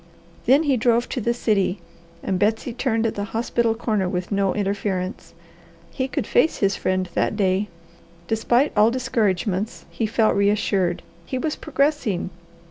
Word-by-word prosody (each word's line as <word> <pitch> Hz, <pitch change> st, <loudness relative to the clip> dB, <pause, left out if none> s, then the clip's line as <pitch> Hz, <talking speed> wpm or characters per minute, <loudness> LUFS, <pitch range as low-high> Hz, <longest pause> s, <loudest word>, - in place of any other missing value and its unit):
Then 275 Hz, +6 st, +5 dB
he 280 Hz, -4 st, +2 dB
drove 235 Hz, +1 st, +2 dB
to 255 Hz, -, -3 dB
the 235 Hz, -, +1 dB
city 210 Hz, -5 st, 0 dB, 0.4 s
and 190 Hz, -2 st, -1 dB
Betsy 220 Hz, +4 st, 0 dB
turned 230 Hz, -2 st, 0 dB
at 225 Hz, -, 0 dB
the 205 Hz, -, -3 dB
hospital 230 Hz, -1 st, +1 dB
corner 215 Hz, -5 st, 0 dB
with 180 Hz, +2 st, -3 dB
no 195 Hz, -1 st, +1 dB
interference. 195 Hz, -2 st, -3 dB, 0.6 s
He 260 Hz, -1 st, -2 dB
could -, -, -2 dB
face 320 Hz, -, +2 dB
his 195 Hz, -1 st, +1 dB
friend 185 Hz, 0 st, -1 dB
that -, -, 0 dB
day. 195 Hz, 0 st, +1 dB, 0.6 s
Despite 240 Hz, +5 st, +2 dB
all 210 Hz, +1 st, +5 dB
discouragements 215 Hz, -5 st, -1 dB
he 225 Hz, -, -1 dB
felt 220 Hz, 0 st, +2 dB
reassured. 200 Hz, -3 st, +1 dB, 0.2 s
He 260 Hz, -, -2 dB
was 305 Hz, +4 st, -1 dB
progressing. 275 Hz, -, 0 dB
215 Hz, 150 wpm, -23 LUFS, 195-240 Hz, 0.6 s, Then